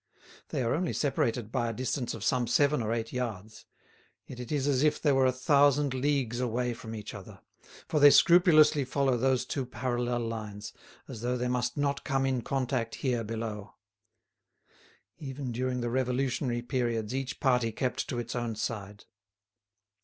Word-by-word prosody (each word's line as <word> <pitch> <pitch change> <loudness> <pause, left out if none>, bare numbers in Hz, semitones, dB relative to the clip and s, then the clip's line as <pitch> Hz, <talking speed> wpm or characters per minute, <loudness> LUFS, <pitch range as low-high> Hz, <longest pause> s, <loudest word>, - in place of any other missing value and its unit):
They 130 - -1
are 115 - +1
only 175 +2 -1
separated 120 -5 -1
by 120 -2 0
a - - -3
distance 125 +1 -2
of 110 - -7
some 125 -2 +1
seven 145 +2 +3
or 110 0 -2
eight 115 -1 -3
yards, 110 -4 -5 0.6
yet 125 - -10
it 125 - -7
is 145 -2 0
as 135 -2 +2
if 150 0 +2
they 150 - +2
were 135 -1 +4
a - - +3
thousand 140 +1 +3
leagues 130 -3 0
away 125 0 -1
from 115 -1 -8
each 105 -2 -7
other, - - -10 0.5
for 155 - +1
they 145 0 +9
scrupulously 155 -3 +6
follow 135 0 +1
those 130 +1 +1
two 135 +1 -2
parallel 120 -1 -2
lines, 110 -3 -6 0.3
as 110 - -8
though 125 +1 -1
they 125 0 -1
must 125 +3 -1
not 140 -1 -1
come 135 0 0
in 130 -2 0
contact 125 -2 -2
here 125 -4 -1
below. 110 -2 -5 1.4
Even 135 -2 -5
during 125 +1 -2
the 120 - -1
revolutionary 125 -1 -1
periods 120 -3 -1
each 135 0 -3
party 125 -4 +2
kept 125 +3 -2
to 120 - -3
its 120 0 -4
own 120 -2 -2
side. 105 -2 -5
125 Hz, 170 wpm, -29 LUFS, 115-135 Hz, 1.4 s, they